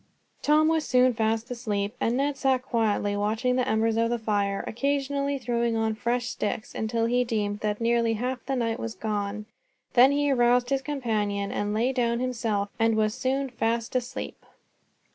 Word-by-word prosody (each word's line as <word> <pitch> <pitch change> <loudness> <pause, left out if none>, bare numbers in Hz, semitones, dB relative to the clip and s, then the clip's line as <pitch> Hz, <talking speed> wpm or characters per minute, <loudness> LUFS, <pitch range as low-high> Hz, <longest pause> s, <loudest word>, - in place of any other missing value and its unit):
Tom 305 +1 +4
was 320 -1 +2
soon 255 -2 +3
fast 225 +2 -1
asleep, 215 -3 -2
and 235 +2 +1
Ned 280 +1 0
sat 265 -2 +1
quietly 215 -5 0
watching 220 +5 0
the 255 0 +1
embers 225 -1 +1
of 230 0 +2
the 240 - 0
fire, 205 -3 -1
occasionally 280 +2 -1
throwing 235 -2 -1
on 220 0 +1
fresh 240 +2 -1
sticks, 215 -2 -3
until 225 +1 -1
he 245 +2 +2
deemed 210 -4 -2
that 210 -1 -2
nearly 230 0 +2
half 250 +3 -3
the 270 - 0
night 230 -2 -1
was 230 -1 -5
gone. 210 -1 -3 0.5
Then 255 +3 +7
he 290 0 +1
aroused 245 0 +3
his 270 -1 +2
companion 215 -8 -2
and 205 0 -2
lay 235 +5 +1
down 235 -2 +1
himself, 230 -5 -1
and 225 0 +3
was 215 -1 +1
soon 270 +3 -1
fast 230 0 -1
asleep. 250 0 -4
235 Hz, 175 wpm, -26 LUFS, 220-255 Hz, 0.5 s, Then